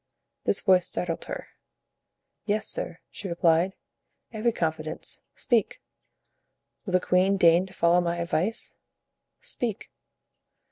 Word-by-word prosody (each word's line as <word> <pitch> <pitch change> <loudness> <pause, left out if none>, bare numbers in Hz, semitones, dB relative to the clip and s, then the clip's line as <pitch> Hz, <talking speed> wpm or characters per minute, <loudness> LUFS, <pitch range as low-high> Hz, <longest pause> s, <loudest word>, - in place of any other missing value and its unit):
This - - +2
voice 185 -3 +4
startled 170 -2 -3
her. - - -6 1.0
"Yes, 215 0 +1
sir," - - +3
she 200 - -6
replied, 170 +1 +2 0.6
"every 225 +2 +1
confidence; 160 -5 -3
speak." 235 -5 +1 1.1
"Will 185 - -3
the 185 - +5
queen 185 +2 +2
deign 175 +1 +5
to 190 - -15
follow 170 +1 +4
my 170 0 -1
advice?" 170 +5 -1 0.7
"Speak." 230 -5 -4
180 Hz, 110 wpm, -26 LUFS, 170-205 Hz, 1.1 s, the